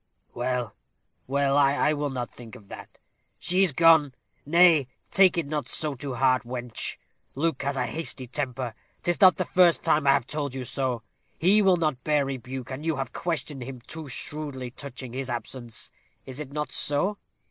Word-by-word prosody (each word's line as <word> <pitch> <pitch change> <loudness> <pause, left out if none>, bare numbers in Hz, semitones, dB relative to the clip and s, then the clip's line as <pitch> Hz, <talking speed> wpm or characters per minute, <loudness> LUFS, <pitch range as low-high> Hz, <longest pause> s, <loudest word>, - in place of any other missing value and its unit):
Well, 120 -2 -2 0.5
well, 140 +1 +1
I 145 +1 +3
will 145 -1 -1
not 125 -3 -4
think 120 -1 -12
of 105 -5 -15
that. - - -11 0.4
She 180 +2 +1
is 190 -4 +4
gone. 160 -2 +5 0.3
Nay, 165 -4 +6 0.2
take 190 -1 +5
it 170 - +1
not 150 0 -3
so 155 -2 -1
to 135 0 -5
heart, 130 0 +3
wench. 120 -1 -4 0.4
Luke 155 0 0
has 140 0 -1
a 125 - +1
hasty 155 -4 -2
temper. 130 -2 -3 0.3
'Tis 175 -1 0
not 185 -1 +8
the 185 - 0
first 175 -1 +4
time 155 -3 +2
I 135 - +7
have 140 -3 +1
told 145 -2 -4
you 130 -1 -4
so. 130 -3 -2 0.3
He 195 +5 +5
will 190 -3 +5
not 155 -7 -1
bear 150 -2 +2
rebuke, 130 -1 -6
and 130 +3 -5
you 160 -1 0
have 135 0 -4
questioned 150 -5 -3
him 130 +1 -7
too 160 +4 -7
shrewdly 135 -2 -4
touching 130 -2 -8
his 130 0 -4
absence. 120 0 -5 0.3
Is 130 +1 -8
it 145 -3 -6
not 150 +1 -3
so? 185 +9 0
140 Hz, 180 wpm, -26 LUFS, 130-155 Hz, 0.5 s, not